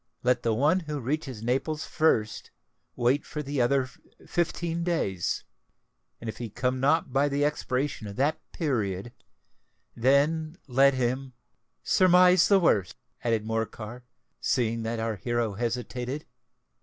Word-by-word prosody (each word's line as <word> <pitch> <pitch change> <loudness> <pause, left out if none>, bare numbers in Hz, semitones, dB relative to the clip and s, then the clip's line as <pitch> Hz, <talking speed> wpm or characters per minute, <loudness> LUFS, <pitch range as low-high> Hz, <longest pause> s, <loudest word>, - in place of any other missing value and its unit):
Let 125 -1 +2
the 115 -2 +1
one 150 +9 +3
who 150 -4 -4
reaches 135 -3 -3
Naples 135 +6 -1
first 110 -9 +1 0.5
wait 125 +4 +2
for 150 0 -5
the 140 -1 -1
other 130 +1 +2 0.4
fifteen 170 -1 -1
days; 100 - -1 0.8
and, 115 - -8
if 110 - -5
he 120 -2 -4
come 125 +4 -1
not 145 0 +2
by 140 +2 +3
the 145 +1 +1
expiration 135 -5 -2
of 100 - -7
that 150 +6 0
period, 115 - -2 0.8
then 155 +6 +2
let 135 +1 +4
him——" 130 +1 -1 0.5
"Surmise 180 -1 +5
the 200 - +6
worst," 100 - +2 0.3
added 115 -2 0
Morcar, 115 +1 -4 0.4
seeing 115 -2 0
that 115 +1 -3
our 110 -1 -2
hero 120 0 -1
hesitated. 125 +5 -3
130 Hz, 130 wpm, -27 LUFS, 115-150 Hz, 0.8 s, the